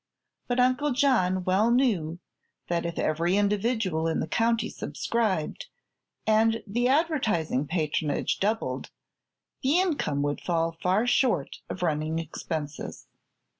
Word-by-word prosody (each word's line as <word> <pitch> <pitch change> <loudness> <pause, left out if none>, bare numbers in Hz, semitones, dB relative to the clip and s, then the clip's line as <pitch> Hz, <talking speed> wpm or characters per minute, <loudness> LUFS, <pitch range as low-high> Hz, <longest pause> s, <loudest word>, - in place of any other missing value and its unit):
But 245 0 0
Uncle 255 +3 +2
John 190 -9 +2
well 190 +5 +3
knew 210 -11 +2 0.5
that 170 -1 0
if 170 - -6
every 170 +5 +1
individual 205 -5 +1
in 165 - 0
the - - -2
county 230 +5 +1
subscribed, 225 - -2 0.6
and 225 +1 +3
the 240 +4 0
advertising 250 - +1
patronage 155 -3 -1
doubled, 215 +3 -1 0.7
the 290 +6 +3
income 285 - 0
would 145 0 -2
fall 165 -1 0
far 190 +6 +2
short 245 - +1
of 180 - -4
running 155 -1 0
expenses. 155 -2 -5
195 Hz, 120 wpm, -27 LUFS, 165-240 Hz, 0.7 s, well